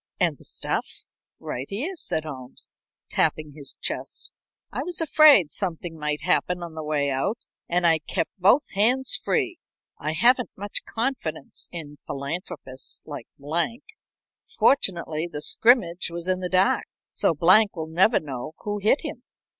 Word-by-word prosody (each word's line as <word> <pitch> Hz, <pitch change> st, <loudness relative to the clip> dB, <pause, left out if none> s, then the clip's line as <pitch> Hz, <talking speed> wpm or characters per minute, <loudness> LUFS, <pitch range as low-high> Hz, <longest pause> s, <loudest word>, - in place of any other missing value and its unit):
"And -, -, +1 dB
the -, -, -15 dB
stuff?" -, -, -3 dB, 0.3 s
"Right 130 Hz, +3 st, -5 dB
here," 280 Hz, -, -2 dB
said 160 Hz, -, -2 dB
Holmes, 130 Hz, -4 st, -9 dB, 0.4 s
tapping 155 Hz, -1 st, 0 dB
his 145 Hz, -2 st, -7 dB
chest. -, -, -4 dB, 0.4 s
"I -, -, -3 dB
was 355 Hz, -1 st, -3 dB
afraid 300 Hz, -, +6 dB
something 175 Hz, -3 st, -2 dB
might 150 Hz, -1 st, -2 dB
happen 180 Hz, 0 st, +1 dB
on 170 Hz, -2 st, -7 dB
the 160 Hz, 0 st, -6 dB
way 145 Hz, -2 st, 0 dB
out 135 Hz, -, -1 dB, 0.3 s
and 175 Hz, 0 st, +2 dB
I 165 Hz, -1 st, +5 dB
kept 155 Hz, -, -2 dB
both 220 Hz, +11 st, +4 dB
hands 245 Hz, +7 st, +3 dB
free. 365 Hz, -7 st, -1 dB, 0.4 s
I 155 Hz, +2 st, -2 dB
haven't 240 Hz, +8 st, +4 dB
much 205 Hz, +1 st, -4 dB
confidence 225 Hz, -, -3 dB
in 150 Hz, -4 st, -7 dB
philanthropists 140 Hz, -2 st, -5 dB
like 145 Hz, -6 st, -8 dB
Blank. 170 Hz, -, -2 dB, 0.6 s
Fortunately 170 Hz, -, +2 dB
the 150 Hz, -1 st, -4 dB
scrimmage 205 Hz, -9 st, +3 dB
was 170 Hz, +1 st, -5 dB
in 185 Hz, 0 st, +2 dB
the 180 Hz, -1 st, -3 dB
dark, 185 Hz, +1 st, +3 dB, 0.3 s
so 165 Hz, -, +1 dB
Blank 195 Hz, +7 st, +5 dB
will 160 Hz, -2 st, -3 dB
never 180 Hz, +8 st, +3 dB
know 140 Hz, 0 st, -6 dB
who 205 Hz, 0 st, -3 dB
hit 215 Hz, +8 st, +3 dB
him." -, -, -6 dB
175 Hz, 150 wpm, -25 LUFS, 155-220 Hz, 0.6 s, afraid